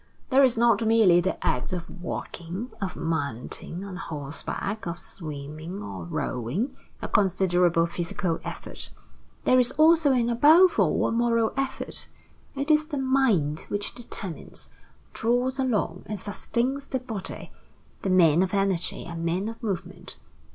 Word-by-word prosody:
There 265 +2 +6
is 255 -3 +4
not 230 -1 +4
merely 220 -6 +5
the 190 +2 -1
act 125 - 0
of 175 -2 -4
walking, 180 +6 -5
of 190 -2 -3
mounting 160 +2 -3
on 190 -2 -7
horseback, 160 +6 -4
of 170 0 -4
swimming 155 +3 -6
or 95 -4 -6
rowing 125 - -2 0.3
a - - -1
considerable 180 -3 +3
physical 170 0 -2
effort. - - -4 0.5
There 255 - +5
is 250 0 +6
also 315 -1 +5
and 240 -2 +2
above 315 +10 +6
all - - +3
a - - +1
moral 230 -1 +2
effort. 270 0 -3 0.5
It 280 +3 0
is 305 0 +4
the 300 -3 -3
mind 250 - +1
which 205 0 -2
determines, 210 -7 -6 0.4
draws 245 +3 0
along, 210 -9 0
and 210 -2 -4
sustains 250 +7 -2
the 260 - -2
body. 225 -6 -5 0.5
The 195 - -1
men 170 -3 +5
of 190 +1 0
energy 195 -3 0
are 170 - -6
men 170 +5 -1
of 225 +2 -9
movement. 200 -7 -5
200 Hz, 145 wpm, -26 LUFS, 170-245 Hz, 0.5 s, There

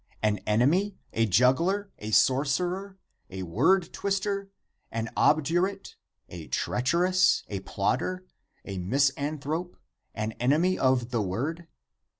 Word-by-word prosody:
an 105 -1 +2
enemy? 160 - +2 0.2
a 115 0 +2
juggler? 165 - +2
a 105 - -6
sorcer 140 - +2
er? 195 0 -9 0.3
a 95 0 -6
word 155 - +2
twister? 200 0 -2 0.4
an 115 0 -3
obdurate? 175 +6 +1 0.3
a 85 -3 -9
treacherous? 180 +9 +2
a 100 - -3
plotter? 130 - -2 0.4
a 95 -2 -5
misanthrope? 140 - -1 0.4
an 110 0 -2
enemy 155 +9 +2
of 130 -2 +1
the 120 -3 0
word? 140 - -3
140 Hz, 115 wpm, -27 LUFS, 115-185 Hz, 0.4 s, an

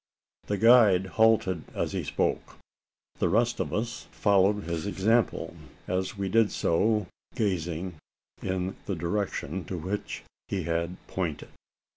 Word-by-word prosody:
The 100 - 0
guide 110 -5 +6 0.2
halted 95 -7 +4
as - - -1
he - - -2
spoke. - - -1 0.6
The - - +2
rest 120 +3 +2
of - - -1
us 115 +2 -3
followed 100 0 +3
his 85 +2 -3
example 110 +4 +1 0.3
as 95 +4 -2
we 100 -1 -1
did 110 +1 +3
so, 105 +5 +2 0.3
gazing 90 -4 -2 0.4
in 95 0 -2
the 100 - -1
direction 90 -1 -2
to 90 - -4
which 95 +6 -4 0.2
he 95 -3 -2
had 85 +2 -1
pointed. 85 -6 -3
95 Hz, 130 wpm, -28 LUFS, 90-105 Hz, 0.6 s, guide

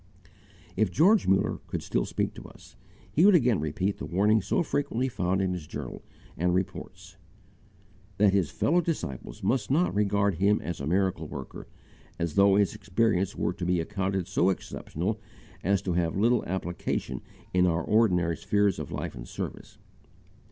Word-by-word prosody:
If 110 - +2
George 200 +7 +4
Muller 95 0 +2
could - - -4
still - - 0
speak - - -2
to - - -10
us, - - -16 0.4
he 150 - +3
would 200 -1 +7
again 125 - +3
repeat 85 +6 -2
the - - -4
warning 105 +4 +3
so 95 - 0
frequently 140 -4 -1
found 95 -5 0
in 95 -1 0
his 85 -4 -6
journal - - -6 0.3
and 90 +2 +1
reports, 95 0 -5 1.0
that 100 -1 +4
his 95 -6 +2
fellow 175 +4 +2
disciples 70 - -4
must 125 -5 0
not 160 +7 +2
regard 100 -1 +2
him 100 +2 +3
as 85 -1 -5
a 70 - -3
miracle 90 -2 0
worker, 70 -2 -8 0.5
as 85 -2 -2
though 100 0 +5
his 100 -1 +3
experience 100 -2 0
were - - -1
to - - -7
be 90 0 +1
accounted 95 +1 -2
so 95 -1 +2
exceptional 95 +2 -3 0.4
as 95 +1 +1
to 90 - -1
have 85 0 0
little 115 +3 +3
application 90 -1 -3 0.3
in 90 0 +4
our 80 -1 0
ordinary 90 -6 +2
spheres 100 -2 +1
of - - -6
life - - -4
and - - -9
service. - - -7
95 Hz, 165 wpm, -28 LUFS, 90-105 Hz, 1.0 s, would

